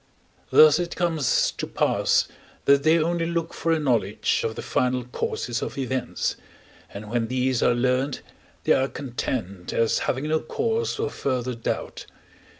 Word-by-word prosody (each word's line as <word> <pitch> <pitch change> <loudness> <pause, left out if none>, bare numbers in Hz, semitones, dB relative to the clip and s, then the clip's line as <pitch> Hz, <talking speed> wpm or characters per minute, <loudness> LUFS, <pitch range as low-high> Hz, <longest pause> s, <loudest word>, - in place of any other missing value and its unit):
Thus 155 +1 +7
it 175 -1 -3
comes 165 -6 +1
to - - -5
pass - - +2 0.4
that 140 0 +5
they 155 +3 +4
only 165 +1 0
look 170 -1 -2
for 165 - -1
a 165 - +3
knowledge 115 -9 +1
of 110 -1 -2
the - - -6
final 125 0 0
causes 120 0 -3
of - - -5
events, 130 -2 -2 0.5
and 105 +2 -8
when 115 +1 -1
these 130 0 0
are 120 - +3
learned, 130 +3 0 0.4
they - - +4
are 135 - +2
content, 120 -9 -4
as 115 -1 +2
having 135 +4 -1
no 160 +1 +2
cause 455 - -1
for 445 +1 -2
further 125 -2 -2
doubt. 115 -1 -4
130 Hz, 155 wpm, -24 LUFS, 120-160 Hz, 0.5 s, Thus